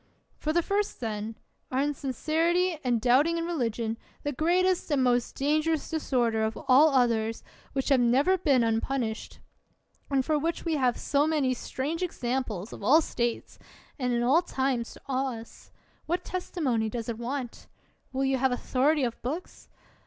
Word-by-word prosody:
For 310 - -1
the 340 +2 +2
first, 405 +2 -1
then, 220 -1 -4 0.3
our 255 - -2
insinceritv 315 +5 0
and 245 -3 +1
doubt 255 +6 +4
ing 335 0 0
m 335 - -2
religion, 230 -8 -2 0.2
the 290 - -1
greatest 355 +6 +1
and 285 -4 +2
most 245 -1 +1
dangerous 310 +3 0
disorder 240 -8 +1
of 220 0 -1
all 275 +5 +7
others, 230 -4 +1 0.3
which 270 0 -1
has 270 -2 +5
never 260 +10 +4
been 280 -9 +3
unpunished, 225 0 -2 0.7
and 270 -2 +1
for 305 -1 +1
which 330 +4 -2
we 330 - 0
have 255 -3 +2
so 290 +1 +1
many 290 -5 +1
strange 285 +6 -4
examples 245 - -3
of - - -9
all 270 +10 +6
states 240 -7 -3 0.4
and 250 -2 0
in 240 0 +1
all 275 +8 +4
times 260 -7 -1
to - - -15
awe 260 -2 -1
us,— 225 - -14 0.4
what 350 +3 -1
testimony 275 - -1
does 230 0 -5
it 235 -1 -4
want? 245 0 -5 0.4
Will 265 - -2
40 270 - +2
ELIOT - - +1
you 265 - +2
have 265 0 +2
authority 270 +4 +1
of 235 -2 -2
books 305 +9 -6
265 Hz, 170 wpm, -28 LUFS, 240-310 Hz, 0.7 s, all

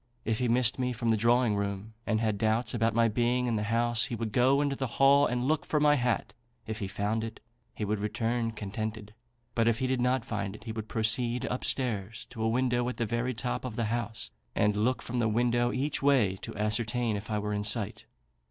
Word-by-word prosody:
If 110 -1 0
he 125 - +1
missed 120 +1 +3
me 125 -1 0
from 115 0 -2
the - - +4
drawing 115 0 +3
room, 100 +1 -3
and 110 - +1
had 110 -3 0
doubts 110 +1 +1
about 115 -1 +1
my 115 0 +4
being 120 +3 +1
in 120 -2 0
the 105 - 0
house, 120 0 +2
he 125 - -3
would 115 -1 -3
go 130 +5 +4
into 145 -1 +1
the 135 -1 -2
hall 140 +1 +6
and 125 +1 -1
look 155 +1 +1
for 150 - 0
my 150 0 +5
hat: 125 -4 0 0.3
if 110 0 -5
he 100 - -3
found 105 +3 -1
it, 115 - -6 0.4
he 105 - -3
would 105 +1 -1
return 115 +3 -1
contented; 110 0 -5 0.4
but 115 -1 +2
if 115 -1 +3
he 130 - -1
did 130 -1 0
not 125 -1 +1
find 100 -3 -3
it, - - -12
he 115 - -5
would 110 -1 -5
proceed 120 +3 +1
up 125 - -3
stairs 115 -3 -2
to 115 -3 -7
a 110 - +2
window 125 0 +1
at 125 - -6
the 120 - 0
very 120 +3 -1
top 120 +2 -2
of 125 -4 -5
the 115 - 0
house, 115 - -4 0.2
and 105 0 +2
look 120 +5 0
from 125 0 -3
the 115 -2 +2
window 120 +2 +2
each 140 +4 -1
way, 130 -9 +3
to 110 - -8
ascertain 110 +2 0
if 105 +2 -6
I 105 - 0
were 105 0 -2
in 105 0 -1
sight. 105 0 0
115 Hz, 235 wpm, -29 LUFS, 110-125 Hz, 0.4 s, hall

